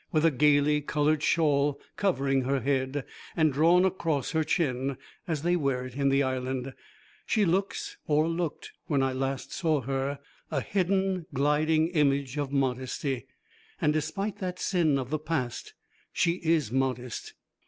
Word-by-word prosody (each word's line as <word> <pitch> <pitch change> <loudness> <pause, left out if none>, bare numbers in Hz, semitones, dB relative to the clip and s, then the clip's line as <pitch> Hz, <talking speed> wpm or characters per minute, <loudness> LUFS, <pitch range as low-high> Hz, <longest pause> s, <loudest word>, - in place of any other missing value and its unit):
With 160 -2 +2
a 165 - +5
gaily 150 +1 +3
coloured 150 +1 +1
shawl 145 -3 +2 0.2
covering 140 -9 +1
her 135 0 0
head, 135 +1 -1 0.3
and 155 -3 +3
drawn 170 +6 +5
across 165 -7 -1
her 160 -1 +1
chin, 135 -5 0 0.3
as 160 -4 -2
they 175 +1 +2
wear 135 -6 0
it 125 -1 -9
in 140 0 +2
the 135 +1 +3
Island, 130 0 -2 0.5
she 215 -2 +3
looks, 190 +3 -1
or 155 +1 +3
looked 165 -2 -3 0.2
when 140 -5 +2
I 135 -1 0
last 135 0 -3
saw 155 -5 +1
her, 135 +2 -2 0.3
a 145 - 0
hidden, 190 0 0
gliding 155 +3 +2
image 140 -5 +1
of 145 -2 -2
modesty. 130 -1 -1 0.5
And 150 -5 +2
despite 160 +7 -2
that 180 -1 -3
sin 165 -7 +2
of 130 0 -4
the 155 - 0
past 155 -6 -3 0.4
she 170 +2 +1
is 160 -8 +2
modest. 125 -2 -2
145 Hz, 155 wpm, -28 LUFS, 135-165 Hz, 0.5 s, a